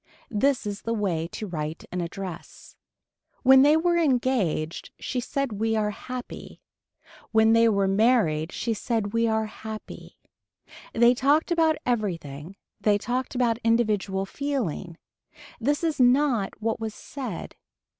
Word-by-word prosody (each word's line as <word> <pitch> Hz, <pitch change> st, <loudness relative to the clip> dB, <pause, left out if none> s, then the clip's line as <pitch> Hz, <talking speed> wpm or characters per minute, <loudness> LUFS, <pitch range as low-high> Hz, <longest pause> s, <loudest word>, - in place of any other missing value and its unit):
This 255 Hz, +3 st, +1 dB
is 205 Hz, -1 st, -4 dB
the 230 Hz, 0 st, -2 dB
way 175 Hz, -6 st, -1 dB
to 215 Hz, -, -6 dB
write 160 Hz, -4 st, -5 dB
an 180 Hz, -, -2 dB
address. 175 Hz, 0 st, -8 dB, 0.7 s
When 265 Hz, 0 st, +8 dB
they 295 Hz, +3 st, +6 dB
were 345 Hz, +1 st, +2 dB
engaged 245 Hz, -, 0 dB
she 255 Hz, -, -3 dB
said 260 Hz, -4 st, -3 dB
we 225 Hz, 0 st, +1 dB
are 210 Hz, -1 st, +1 dB
happy. 250 Hz, +4 st, -8 dB, 0.7 s
When 220 Hz, 0 st, +5 dB
they 230 Hz, 0 st, +5 dB
were 200 Hz, -2 st, +2 dB
married 195 Hz, -7 st, +2 dB
she 230 Hz, -, -2 dB
said 220 Hz, -1 st, -2 dB
we 230 Hz, 0 st, +2 dB
are 220 Hz, 0 st, +1 dB
happy. 215 Hz, 0 st, -9 dB, 0.7 s
They 235 Hz, +1 st, +5 dB
talked 285 Hz, +7 st, +2 dB
about 325 Hz, -2 st, +3 dB
everything 175 Hz, -, -3 dB, 0.2 s
they 205 Hz, -1 st, +3 dB
talked 250 Hz, +5 st, -3 dB
about 235 Hz, -2 st, +1 dB
individual 210 Hz, -4 st, +1 dB
feeling. 205 Hz, -, -3 dB, 0.6 s
This 290 Hz, +7 st, 0 dB
is 320 Hz, -4 st, 0 dB
not 250 Hz, -4 st, +3 dB
what 225 Hz, +1 st, -1 dB
was 220 Hz, -1 st, -4 dB
said. 250 Hz, -, -7 dB
225 Hz, 135 wpm, -26 LUFS, 195-255 Hz, 0.7 s, When